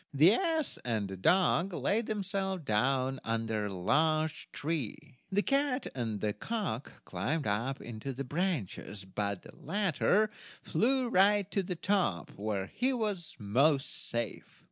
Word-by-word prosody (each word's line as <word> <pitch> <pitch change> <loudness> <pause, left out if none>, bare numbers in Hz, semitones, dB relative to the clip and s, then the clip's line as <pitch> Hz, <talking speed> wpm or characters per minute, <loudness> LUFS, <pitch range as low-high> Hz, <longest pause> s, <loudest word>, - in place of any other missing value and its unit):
The 160 +8 +7
ass 325 -2 0
and 110 -4 -1
the 95 - -6
dog 180 - +3
laid 215 +6 +1
themselves 195 -3 -1
down 130 +3 +1
under 115 -2 -1
a - - -5
large 155 - +1
tree, 150 -2 -4
the 205 +2 +2
cat 275 -1 +1
and 115 -5 -2
the 105 -1 0
cock 185 - -4
climbed 130 - -1
up 115 +7 0
into 120 +3 -6
the 135 +1 -4
branches, 135 - -2
but 100 0 -3
the - - -13
latter 205 +2 +1 0.3
flew 260 +2 +2
right 200 -1 +4
to 200 - +1
the 180 -1 -3
top, 175 - 0
where 100 -1 -2
he 250 - 0
was 205 -9 -2
most 135 +7 +1
safe. 120 -1 -4
155 Hz, 145 wpm, -32 LUFS, -, 0.3 s, The